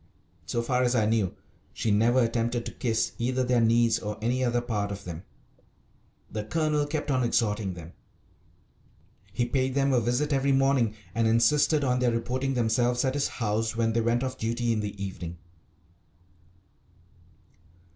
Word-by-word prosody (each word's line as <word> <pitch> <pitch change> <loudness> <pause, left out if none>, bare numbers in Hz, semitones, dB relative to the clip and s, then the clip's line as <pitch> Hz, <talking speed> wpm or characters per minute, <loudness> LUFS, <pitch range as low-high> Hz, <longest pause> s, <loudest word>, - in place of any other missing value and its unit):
So 120 - -1
far 125 +1 +1
as 125 0 +2
I 110 -3 +3
knew 105 -3 0 0.4
she 110 - -1
never 120 +5 +3
attempted 115 +1 -1
to - - -5
kiss 115 -3 -1
either 130 +2 0
their 125 -1 +2
knees 115 0 +3
or 105 -2 -5
any 125 +4 0
other 120 -1 +1
part 105 -4 -2
of 100 0 -6
them. 85 -3 -7 1.1
The 105 0 -3
Colonel 150 +4 0
kept 145 -1 -2
on 130 -1 +1
exhorting 105 -5 0
them. 85 0 -10 1.4
He 120 - 0
paid 130 +1 -1
them 140 -1 +2
a 125 - +3
visit 125 +6 0
every 135 0 +2
morning, 135 -5 +2 0.2
and 115 0 +1
insisted 145 +6 +3
on 125 -2 +1
their 125 -1 +2
reporting 130 +3 -1
themselves 120 +2 +1
at 130 - 0
his 145 0 0
house 110 0 -2
when 115 -1 +1
they 115 - +1
went 120 +2 +1
off 130 0 -4
duty 115 +1 -1
in 110 - -1
the 105 -1 -5
evening. 90 -3 -6
120 Hz, 165 wpm, -27 LUFS, 110-130 Hz, 1.4 s, I